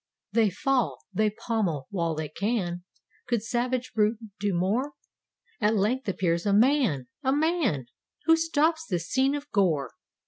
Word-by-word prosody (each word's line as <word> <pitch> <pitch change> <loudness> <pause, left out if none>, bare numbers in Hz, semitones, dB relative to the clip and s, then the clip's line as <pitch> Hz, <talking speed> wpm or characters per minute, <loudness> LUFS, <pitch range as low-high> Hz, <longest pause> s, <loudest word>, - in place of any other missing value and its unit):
They 225 -2 +3
fall. 255 +6 0 0.2
They 215 +3 +2
pommel 205 - -2
while 170 -4 -1
they 155 0 -3
can— 180 -2 -2 0.4
Could 235 -4 0
savage 250 +2 -1
brute 215 +1 +2 0.2
do 205 0 0
more? 205 +11 0 0.7
At 215 0 +2
length 215 +4 0
appears 170 -1 0
a 200 - +3
man! 220 - +3
a 265 - +1
man 295 - +1
I - - -16 0.4
Who 325 +1 +6
stops 325 0 +1
this 175 -3 -2
scene 270 +6 +2
of 290 0 -6
gore. 160 - +1
215 Hz, 150 wpm, -27 LUFS, 180-260 Hz, 0.7 s, Who